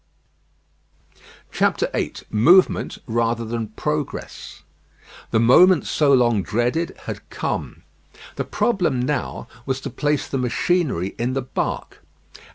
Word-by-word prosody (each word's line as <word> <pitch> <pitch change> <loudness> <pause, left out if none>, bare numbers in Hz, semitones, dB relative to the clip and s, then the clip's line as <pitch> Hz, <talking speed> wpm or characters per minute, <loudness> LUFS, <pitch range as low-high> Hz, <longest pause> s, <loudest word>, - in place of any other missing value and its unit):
VIII - - 0 0.2
MOVEMENT 170 - +4
RATHER 115 0 0
THAN 115 0 -3
PROGRESS 110 - -5 0.7
The 110 - +2
moment 165 +9 +6
so 145 -2 +2
long 120 -5 +4
dreaded 120 - -1
had - - -7
come. - - -4 0.5
The - - -2
problem 180 - 0
now 130 +1 -2 0.2
was 135 -1 -1
to - - -6
place 145 -1 -1
the 135 - -2
machinery 125 - 0
in 120 +2 -1
the 135 -1 -2
bark. 130 - -4
125 Hz, 110 wpm, -22 LUFS, 115-150 Hz, 0.7 s, moment